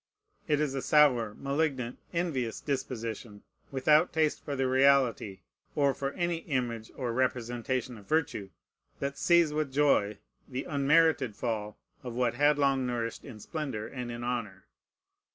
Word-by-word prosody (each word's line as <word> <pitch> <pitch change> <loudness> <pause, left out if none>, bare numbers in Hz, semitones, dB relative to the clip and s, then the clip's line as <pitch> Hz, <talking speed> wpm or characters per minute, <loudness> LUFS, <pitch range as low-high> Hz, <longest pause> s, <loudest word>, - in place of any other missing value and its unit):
It 150 -2 +2
is 150 -3 0
a 135 - -2
sour, 125 -9 +4
malignant, 140 -4 -2
envious 145 -10 -1
disposition, 115 -6 -4 0.3
without 150 +5 +3
taste 155 -2 +1
for 145 - -3
the 135 -1 0
reality, 130 -7 +3 0.3
or 140 -2 +3
for 135 0 -3
any 175 -1 -1
image 120 -8 -3
or 125 -3 -3
representation 125 -1 -1
of 100 - -17
virtue, 145 -11 0 0.5
that 140 0 -3
sees 170 -3 +4
with 150 -2 -1
joy 130 -8 +2 0.3
the 130 +1 -4
unmerited 145 -4 +3
fall 110 -3 -3 0.2
of 125 -3 -7
what 125 -1 +1
had 145 +3 +3
long 135 -2 +2
nourished 115 -2 -3
in 115 -6 -10
splendor 135 -5 -4
and 125 -2 -6
in 120 0 -6
honor. 115 -6 -4
130 Hz, 145 wpm, -30 LUFS, 115-145 Hz, 0.5 s, sour